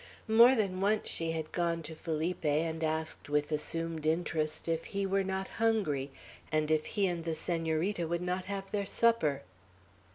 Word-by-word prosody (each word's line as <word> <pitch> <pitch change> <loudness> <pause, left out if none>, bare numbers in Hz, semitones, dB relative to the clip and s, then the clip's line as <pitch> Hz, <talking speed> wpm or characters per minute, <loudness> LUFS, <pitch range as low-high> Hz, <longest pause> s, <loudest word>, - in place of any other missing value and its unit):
More 235 +4 +7
than 195 -5 0
once 210 +2 +1
she 165 0 -1
had 160 -1 -4
gone 170 -1 0
to 160 +1 -6
Felipe, 160 +2 -3
and 160 +2 0
asked 160 -1 -2
with 150 +1 +1
assumed 160 +1 -2
interest 160 -1 -1
if 165 0 -1
he 200 -1 -2
were 195 0 +1
not 190 0 -2
hungry, 195 -12 0 0.4
and 155 0 +1
if 155 -1 +2
he 200 - +1
and 175 -3 -1
the 165 -1 -2
Senorita 165 +2 -1
would 170 +1 -1
not 180 +1 -2
have 195 -1 -5
their 200 -1 -1
supper. 160 -15 +2
165 Hz, 170 wpm, -32 LUFS, 155-195 Hz, 0.4 s, More